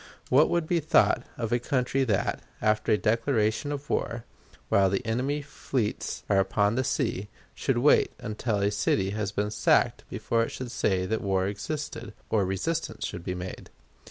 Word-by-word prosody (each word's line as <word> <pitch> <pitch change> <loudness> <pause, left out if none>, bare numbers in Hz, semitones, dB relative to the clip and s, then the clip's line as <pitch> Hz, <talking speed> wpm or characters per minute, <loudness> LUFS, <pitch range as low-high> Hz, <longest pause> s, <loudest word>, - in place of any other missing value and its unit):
What 140 +5 +5
would 170 -2 +1
be 170 +1 +1
thought 155 -5 +3 0.2
of 115 -2 -3
a 120 - +3
country 130 +1 0
that, 105 -6 0 0.2
after 110 0 +1
a 105 - +5
declaration 115 +3 +1
of 145 0 -5
war, 115 -6 -2 0.2
and - - -30 0.2
while 95 -1 +4
the 100 - -1
enemy's 135 +6 -1
fleets 130 -5 -3
were 100 - +3
upon 100 +2 +2
the 130 +2 +1
sea, 110 -8 -1 0.2
should 135 -3 -1
wait 140 +5 +4
until 110 -3 -2
a 100 - +2
city 100 -1 +1
had 105 -1 -2
been 105 +1 0
sacked 105 - +2
before 115 - 0
it 115 - -2
would 125 -2 -5
say 95 -6 +1
that 110 +3 -1
war 95 -2 +1
existed, 115 +4 -5 0.2
or 105 -3 +3
resistance 95 - -2
should 85 - -6
be 90 0 -3
made? 90 +1 -7
110 Hz, 180 wpm, -27 LUFS, 100-130 Hz, 0.2 s, What